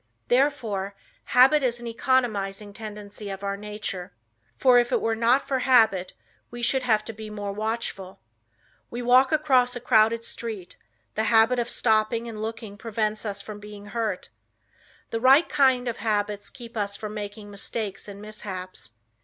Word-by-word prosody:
Therefore 235 -8 +1 0.3
habit 265 +5 +6
is 240 -2 0
an 240 - -9
economizing 215 -5 0
tendency 210 -1 -8
of 195 0 -6
our 200 0 -1
nature, 205 -3 -6 0.5
for 250 -2 +6
if 240 0 0
it - - +3
were 225 0 0
not 235 +4 +3
for 265 -2 0
habit 220 -8 +4 0.4
we 240 0 -7
should 265 +3 +2
have 215 -4 +2
to 225 - -6
be 215 0 -8
more 205 -1 -4
watchful. 215 -3 -4 0.7
We 240 +1 -5
walk 255 +2 +5
across 260 -5 +3
a - - -3
crowded 230 -1 +3
street; 215 -6 -6 0.4
the 220 - 0
habit 225 +3 +4
of 240 0 -1
stopping 225 0 +1
and 220 -2 -6
looking 220 -2 -6
prevents 215 -1 -2
us 200 -1 -4
from 210 0 -8
being 205 -1 -10
hurt. 230 -2 -2 0.8
The 230 - -1
right 270 +7 +6
kind 260 -4 +3
of 235 - -2
habits 205 -2 -1
keeps 235 -3 -10
us 200 -1 -2
from 215 0 -6
making 205 0 -7
mistakes 200 0 -5
and 200 -1 -9
mishaps. 185 - -7
220 Hz, 160 wpm, -25 LUFS, 205-240 Hz, 0.8 s, habit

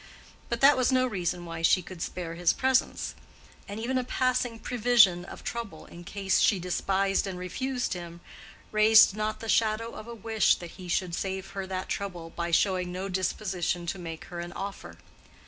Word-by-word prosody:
But 235 -1 -2
that 280 +2 +8
was 255 0 +2
no 255 0 +3
reason 180 -6 -2
why 165 -1 -6
she 180 +2 +4
could 180 -1 -10
spare 170 -2 -4
his 170 0 +2
presence: 260 0 +1 0.5
and 205 +2 -6
even 255 +3 0
a - - -1
passing 250 -2 0
prevision 225 -7 +4
of - - -10
trouble 225 -10 -5
in 175 - -12
case 195 +1 0
she 200 - +4
despised 195 +2 0
and 185 -2 -5
refused 250 +9 -2
him, 170 -1 -8 0.5
raised 215 -1 +7
not 215 0 -2
the 225 - -6
shadow 220 +1 +1
of 215 - -9
a 235 - -7
wish 220 0 +2
that 175 -1 -9
he 185 -2 -10
should 175 0 -1
save 190 +1 -3
her 195 -1 -5
that 185 0 -4
trouble 175 -5 -4
by 170 0 -3
showing 180 +1 +2
no 185 +2 -4
disposition 185 -2 -1
to 180 +2 -3
make 165 -2 -7
her 175 -2 -7
an 175 0 -6
offer. 195 +1 -7
195 Hz, 185 wpm, -28 LUFS, 175-225 Hz, 0.5 s, that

